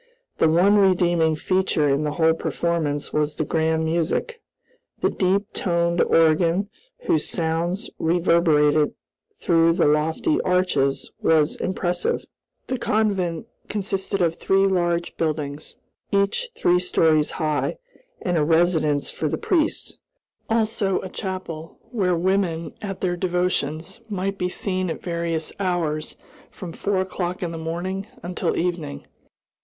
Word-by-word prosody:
The 160 - +5
one 190 +6 +5
redeeming 175 -4 +3
feature 185 -2 +1
in 140 +2 +1
the 150 - -1
whole 160 0 +3
performance 160 -3 -2
was 150 0 0
the 155 - -1
grand 160 0 +1
music. 170 - -1 0.6
The - - +1
deep 195 +2 0
toned 170 -1 +1
organ, 165 +4 +3 0.3
whose 355 -9 +1
sounds 170 +5 0
reverberated 160 -3 +3 0.4
through 165 -2 +3
the 170 - +2
lofty 155 - +1
arches, 180 -7 +1
was 155 -2 +3
very - - -2
impressive. 175 -1 -1 0.4
The 260 -1 -3
convent 195 -8 0 0.2
consisted 195 -2 -2
of 165 -1 +2
three 195 0 +2
large 175 -3 0
buildings, 150 -2 -3 0.4
each 200 - +1
three 180 0 +3
stories 160 -4 +2
high, 150 -3 -1 0.5
and 175 -3 +1
a - - +2
residence 160 -2 +2
for 155 - -2
the - - -1
priests; 320 -4 0 0.5
also 220 -3 +1
a 190 - -6
chapel, 180 -5 -6
where 190 -7 +1
women, 170 -2 0
at 195 -2 -5
their 180 -2 0
devotions, 180 +1 -1
might 195 -1 -2
be 180 - 0
seen 185 -1 -2
at - - -5
various 170 -2 -2
hours 170 -5 -1 0.3
from 175 -3 -8
four 200 -2 0
o'clock 180 -1 -3
in 170 - -2
the 165 - -6
morning 180 +5 -4 0.2
until 175 0 -2
evening. 165 -4 -3
175 Hz, 130 wpm, -23 LUFS, 160-190 Hz, 0.6 s, The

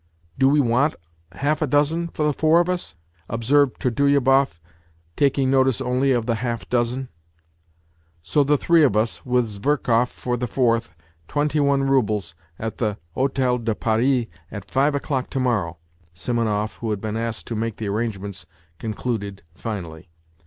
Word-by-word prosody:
" 85 -1 -36
Do 135 0 +5
we 150 +2 +4
want 130 +4 +2 0.4
half 150 +2 0
a 155 - +2
dozen 150 +5 +2
for 155 -2 -2
the 150 - +2
four 160 +3 +4
of 175 - +2
us? 175 - -3 0.2
" - - -41
observed 130 +4 +2
Trudolyubov, 135 -4 +2 0.6
taking 135 -2 +2
notice 130 -2 +3
only 130 +2 +1
of 120 -3 +1
the 120 - +1
half 120 -2 -3
dozen. 125 +2 0 0.6
" 85 0 -39 0.3
So 145 - +2
the 145 +1 +3
three 170 +2 +4
of 125 -8 +3
us. 110 +2 0
with 125 -1 +2
Zverkov 120 +2 +1
for 125 -1 -3
the 125 +1 -2
fourth, 115 -9 +1 0.3
twenty 150 0 0
one 140 -1 +3
roubles, 110 -10 +1 0.2
at 110 0 -5
the 105 -3 0 0.2
Hotel 130 0 +1
de 115 -2 -1
Paris 120 +3 +1 0.2
at 100 +1 -7
five 140 +6 +1
o'clock 140 -2 -2
to 135 - -2
morrow," 105 -10 0 0.4
Simonov, 110 +2 -1
who 115 - -4
had 105 -2 -1
been 110 +1 -4
asked 115 0 -3
to 115 - -4
make 115 -1 -2
the 110 - -4
arrangements, 100 -4 -3 0.3
con 110 -2 -4
cluded 100 -6 -4
finally. 90 -6 -6
125 Hz, 170 wpm, -23 LUFS, 110-140 Hz, 0.6 s, Do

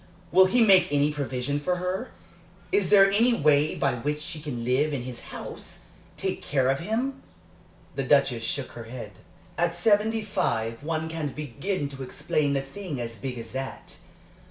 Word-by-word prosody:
"Will 185 +2 +7
he 235 +5 +4
make 190 -4 +6
any 145 +1 +2
provision 140 -1 -2
for 180 +5 0
her? 180 +7 -3 0.6
Is 400 +2 +2
there 195 -1 +7
any 235 +4 +4
way 150 -3 +3
by 140 - +1
which 145 +5 -2
she 155 +1 -5
can 125 -6 -4
live 140 +5 +2
in 130 -3 -2
his 125 -1 -7
house - - -8 0.3
take - - -2
care 135 -2 +1
of 135 +1 +1
him?" 235 +9 -2 0.7
The 140 - -1
Duchess 135 -3 +3
shook 130 +3 -2
her 115 - -8
head. 115 -2 -7 0.5
"At 170 0 +2
seventy 215 +4 +3
five 115 - -1
one 160 0 -2
can't 160 -4 -4
begin 150 - -3
to 135 -1 -9
explain 140 +2 0
a 135 - -1
thing 150 0 -6
as 115 -1 -4
big 125 +3 -5
as 115 -1 -8
that. 135 +1 -6
145 Hz, 175 wpm, -26 LUFS, 130-185 Hz, 0.7 s, Will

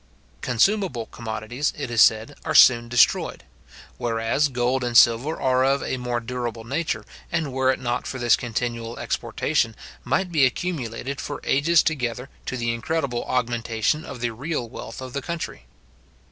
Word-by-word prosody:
Consumable 145 - +1
commodities, 115 +5 -3
it 135 -5 -4
is 115 - +3
said, 110 +5 +4
are - - -2
soon 120 -2 +7
destroyed; 120 0 +3 0.6
whereas 115 +5 +1
gold 125 0 0
and 120 -1 +2
silver 120 +9 +5
are 130 0 +2
of 135 +1 +2
a 130 - -2
more 125 -1 -2
durable 120 -1 -4
nature, 125 -4 -2 0.3
and 160 -6 -1
were 130 0 +2
it 130 - -3
not 125 0 -2
for 130 - -4
this 120 -2 +4
continual 120 0 -4
exportation, - - -1 0.3
might 190 -2 0
be 155 -4 +3
accumulated 135 -2 -2
for 145 - -5
ages 160 +5 +3
together, 125 -4 -2 0.2
to 130 - -2
the 120 -1 -1
incredible 125 0 -2
augmentation 120 +2 0
of 130 -4 -8
the 120 -1 0
real 130 +2 -3
wealth 115 +1 -8
of 130 -1 -7
the 140 - -2
country. 165 - -5
125 Hz, 160 wpm, -24 LUFS, 115-140 Hz, 0.6 s, soon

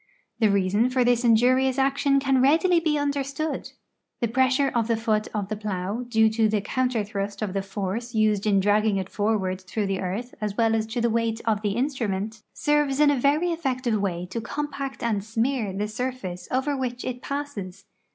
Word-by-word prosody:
The 220 -3 +4
reason 200 +4 +2
for 255 0 +2
this 245 0 +2
injurious 255 +3 +4
action 275 +1 +2
can 270 -1 +2
readily 330 +6 +4
be 310 -2 +1
understood. 285 +1 -2 0.5
The 235 - +1
pressure 260 +3 +2
of 235 -3 0
the 230 -1 +1
foot 215 -1 0
of 205 -3 -2
the 215 - -2
[flow, 205 +2 -3
due 220 -2 +4
to 220 -1 +2
the 210 0 +1
counter 245 +2 0
thrust 200 0 -4
of 195 -3 -3
the 195 - 0
force 205 +4 -4
used 215 -1 +2
in 200 -2 +4
dragging 205 +1 +2
it 190 0 -3
forward 200 -3 -1
through 200 +3 -3
the 195 -1 -1
earth 200 +7 -4
as 210 -1 -3
well 225 -1 +3
as 220 -1 0
to 235 +2 -3
the 235 -1 +2
weight 230 0 0
of 215 -2 +1
the 205 -2 0
instrument, 220 -5 -2
serves 295 -2 +1
in 295 -1 +6
a - - +2
very 300 +7 +2
effective 255 -9 -1
way 180 -3 -2
to 230 - -3
compact 280 0 -4
and 215 -4 0
smear 225 0 -1
the 205 +3 -2
surface 220 -6 -5
over 265 +3 0
which 250 -2 -3
it 250 -1 -4
passes. 210 -10 -5
230 Hz, 195 wpm, -25 LUFS, 205-265 Hz, 0.5 s, in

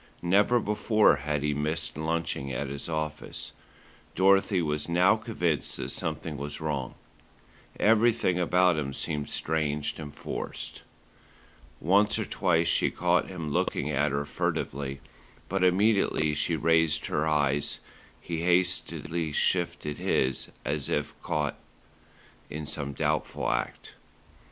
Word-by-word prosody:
Never 100 +7 +4
before 105 -5 +3
had 75 0 -2
he 75 0 +1
missed 75 +2 -1
lunching 80 -3 -2
at 65 +2 -3
his 70 +3 -5
office. 80 -1 -4 0.6
Dorothy 95 +1 +4
was 75 -1 -2
now 90 +4 +5
convinced 100 -8 -1
that - - -3
something 75 -3 -2
was 70 +1 -5
wrong. 75 -5 -3 0.8
Everything 110 -4 +3
about 90 -1 +3
him 70 -3 -3
seemed 75 -3 -3
strange 75 -2 -1
and 75 -2 -6
forced. 70 - -6 1.0
Once 100 +6 +3
or - - -1
twice 85 -1 +1
she - - +3
caught - - +1
him 85 -5 -5
looking 75 0 0
at 75 0 +1
her 70 +1 -1
furtively; 70 -1 -3 0.5
but 95 0 0
immediately 95 -5 +3
she 80 +3 0
raised 80 0 +2
her 75 +2 0
eyes, 75 -2 +1 0.4
he 85 -1 -4
hastily 85 -2 +1
shifted 75 -2 0
his, 65 0 0 0.2
as 75 -2 -2
if 75 - -1
caught 75 -2 -2 0.9
in 75 0 -5
some 70 -1 -4
doubtful - - -1
act. - - -3
80 Hz, 125 wpm, -28 LUFS, 75-90 Hz, 1.0 s, now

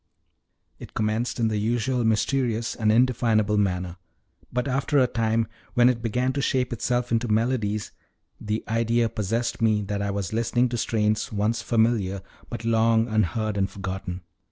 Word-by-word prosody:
It - - -11
commenced 110 +3 -1
in 115 -1 +2
the 105 -1 -1
usual 120 +3 0
mysterious 115 +1 0
and 110 -2 +1
indefinable 110 -3 +2
manner; 90 -3 -1 0.5
but 125 +1 -1
after 135 +3 0
a 130 - +6
time, 115 -1 0 0.3
when 120 0 +6
it 120 -2 -1
began 125 +3 0
to 140 - -1
shape 130 -3 0
itself 120 +1 -1
into 115 +1 +1
melodies, 110 -2 0 0.5
the 105 +1 -3
idea 115 +1 +1
possessed 115 +2 -2
me 110 -2 +2
that 100 0 -3
I 100 - -1
was 100 -1 -3
listening 120 +2 +1
to 120 - -2
strains 105 -1 0
once 105 +2 0
familiar, 110 -4 +1 0.3
but 115 -1 -6
long 115 0 +3
unheard 110 0 0
and 95 0 +1
forgotten. 95 -2 -5
115 Hz, 155 wpm, -25 LUFS, 105-120 Hz, 0.5 s, a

